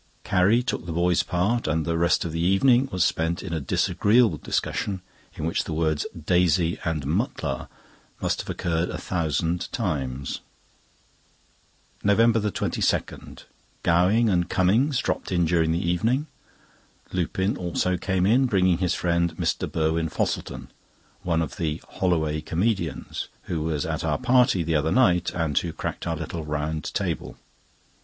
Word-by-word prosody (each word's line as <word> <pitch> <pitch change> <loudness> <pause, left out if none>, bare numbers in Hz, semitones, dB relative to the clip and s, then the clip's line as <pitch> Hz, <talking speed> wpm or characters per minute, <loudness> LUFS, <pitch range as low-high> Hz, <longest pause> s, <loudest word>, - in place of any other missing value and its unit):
Carrie 105 +5 +3
took 120 - -3
the - - -3
boy's 85 +1 +2
part, 100 +6 0
and 80 +1 0
the 85 -1 0
rest 85 +1 +2
of 85 - -3
the 80 - -3
evening 120 +9 +4
was 90 -1 +2
spent 80 +1 -1
in 90 -4 -5
a 80 - 0
disagreeable 105 - +2
discussion, 95 -3 -2 0.3
in 75 - -4
which 80 - 0
the 80 - -4
words 80 -2 0
"Daisy" 85 0 +2
and 80 -4 -2
"Mutlar" 70 -2 -2 0.5
must - - -1
have - - -11
occurred 85 -1 -1
a - - -4
thousand 85 0 -1
times. 65 -2 -2 1.6
NOVEMBER 115 +3 +4
22.—Gowing 95 +2 -1
and 90 -4 +1
Cummings 115 +10 +2
dropped - - -2
in 85 -2 +2
during 80 -1 +2
the 85 +1 -1
evening. 115 - +1 0.9
Lupin 95 +3 0
also 90 +1 -1
came 95 0 0
in, 125 +6 +4
bringing 95 -5 +2
his 90 -2 +1
friend, 85 -1 0
Mr. - - -1
Burwin 80 +1 0
Fosselton—one 85 +2 -4
of 80 - -7
the 80 -3 -2
"Holloway 80 -4 0
Comedians"—who 85 -2 -3
was 75 -2 -1
at - - -3
our - - 0
party 125 -6 +3
the 80 +1 -1
other 80 +1 +1
night, 90 -9 +3
and 80 -4 -1
who 85 - -4
cracked - - -5
our 85 - 0
little 80 +1 -5
round 75 0 -3
table. - - -3
85 Hz, 145 wpm, -25 LUFS, 80-95 Hz, 1.6 s, evening